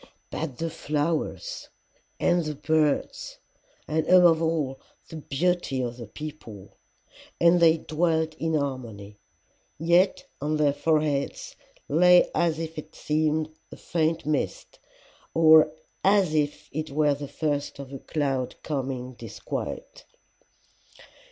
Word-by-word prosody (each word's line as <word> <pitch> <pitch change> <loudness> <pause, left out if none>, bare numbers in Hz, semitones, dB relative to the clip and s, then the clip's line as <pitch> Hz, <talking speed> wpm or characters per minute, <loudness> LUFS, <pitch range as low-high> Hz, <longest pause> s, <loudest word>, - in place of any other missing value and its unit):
"'But 150 -6 -4
the 165 0 -3
flowers! 160 - -2 0.5
and 175 -1 +2
the 155 -1 -4
birds! 160 - 0 0.5
and 155 0 -1
above 175 -3 +6
all 155 -5 -1 0.3
the 160 - -7
beauty 155 -1 -1
of 120 -1 -3
the 115 -3 -8
people! 110 -6 -10 0.6
And 170 +1 +5
they 165 -1 +5
dwelt 160 0 0
in 160 0 0
harmony. 115 -8 -4 0.6
Yet 175 - +2 0.2
on 150 +2 0
their 145 -2 +3
foreheads 150 -1 -1 0.3
lay 180 +4 +6
as 165 -1 +1
it 160 -1 -7
seemed 155 0 0 0.2
a - - -10
faint 165 -1 -1
mist, 150 -1 -3 0.6
or 160 -1 +7 0.3
as 195 -4 +4
it 155 +1 -2
were 150 0 +2
the 145 0 -6
first 145 -1 -2
of 140 -1 -9
a 135 - -6
cloud 135 -5 -2
of - - -36
coming 130 -3 -3
disquiet. 115 -3 -6
155 Hz, 120 wpm, -26 LUFS, 140-165 Hz, 0.6 s, or